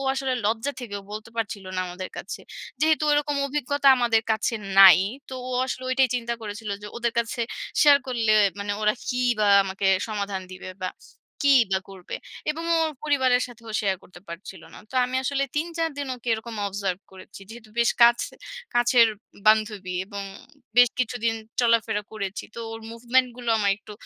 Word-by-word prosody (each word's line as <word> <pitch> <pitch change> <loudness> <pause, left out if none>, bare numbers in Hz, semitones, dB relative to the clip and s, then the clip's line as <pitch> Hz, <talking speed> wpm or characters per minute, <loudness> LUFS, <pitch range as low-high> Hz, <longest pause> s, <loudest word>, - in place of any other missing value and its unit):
আসলে 265 -1 -1
লজ্জা 225 +6 0
থেকেও 205 -5 -6
বলতে 215 +2 -7
পারছিল 205 -3 -3
না - - +1
আমাদের 180 +1 -6
কাছে। - - -6 0.4
যেহেতু 310 0 +3
ওরকম 290 0 +1
অভিজ্ঞতা 285 0 +1
আমাদের 230 -2 +2
কাছে 220 +2 -1 0.2
নাই। 190 -2 +10 0.3
তো 265 - -6
ও - - -5 0.2
আসলে 260 - -4
ঐটাই 260 0 +3
চিন্তা 235 -1 -2
করেছিল। 210 0 -6
যে - - -7
ওদের 235 -1 -1
কাছে 235 +1 -1 0.4
শেয়ার 290 -2 +7
করলে 235 -4 0 0.3
মানে 205 0 -2
ওরা 210 0 +3
কি 250 0 -1 0.2
বা 210 - +3 0.2
আমাকে 195 +1 -2 0.2
সমাধান 200 -3 -3
দিবে 185 0 -8
বা, 185 - 0 0.6
কী 280 - +7 0.2
বা 190 - +3
করবে? 190 -2 -7 0.3
এবং 320 +2 -4
ও - - +3
ওর 315 - -2
পরিবারের 260 -4 +3
সাথেও 230 -2 -12
শেয়ার 195 -2 0
করতে 175 -1 -15
পারছিল 185 +3 -9
না। - - -10
তো - - -13
আমি 255 +1 -2
আসলে 275 +1 0
৩-৪ 330 +1 -1
দিন 285 - -3
ওকে 245 -1 -9
এরকম 225 +1 -7
অবজার্ভ 195 -2 -3
করেছি। 190 +1 -13
যেহেতু 225 -1 -12
বেশ 235 0 +4
কাছ 235 0 +6 0.5
কাছের 240 -1 +5 0.4
বান্ধবী 215 -4 +2
এবং 200 -1 -6 0.5
বেশ 245 -1 +8
কিছুদিন 235 -2 0 0.3
চলাফেরা 230 -3 +2
করেছি। 200 -2 -4
তো - - -8
ওর 225 - -7
মুভমেন্টগুলো 245 +1 0
আমার 200 -2 +2
একটু 210 +1 -13
230 Hz, 170 wpm, -25 LUFS, 205-255 Hz, 0.6 s, নাই